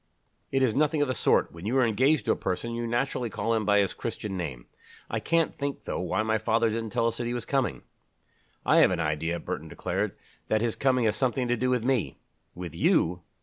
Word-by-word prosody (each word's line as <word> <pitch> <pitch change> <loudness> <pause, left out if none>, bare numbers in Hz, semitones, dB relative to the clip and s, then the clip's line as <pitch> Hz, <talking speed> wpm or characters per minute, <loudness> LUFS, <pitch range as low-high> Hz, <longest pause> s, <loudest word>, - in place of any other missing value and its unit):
"It 135 0 +2
is 120 -4 +3
nothing 150 +2 +2
of - - -1
the 130 - 0
sort; - - +2
when 85 +4 -8
you 125 +4 +1
are 130 - +5
engaged 130 +4 +2
to - - +2
a - - +3
person, 95 +5 -3
you 120 0 -2
naturally 120 0 -1
call 115 +2 -1
him 110 -2 0
by 105 0 +4
his 100 -2 +2
Christian 105 -3 -5
name. 70 -10 -5 0.5
I - - 0
can't 165 0 +1
think, 140 -1 -4
though, - - -3
why 110 +5 0
father 115 +2 +2
didn't 115 0 -3
tell 110 - 0
us 115 0 0
that 120 - -2
he 120 - -2
was 120 - -4
coming." 135 -3 -1 0.8
"I - - +4
have - - +7
an 90 -2 -1
idea," 80 +2 -1
Burton 80 - -5
declared, - - -3 0.3
"that 110 0 +1
his 115 -1 0
coming 130 -3 +2
has 110 - +2
something 130 -1 0
to 120 - +3
do 125 +2 0
with 125 -3 +1
me." 130 -5 0 0.4
"With 85 -3 -6
you? 85 +1 +2
115 Hz, 230 wpm, -27 LUFS, 100-130 Hz, 0.8 s, have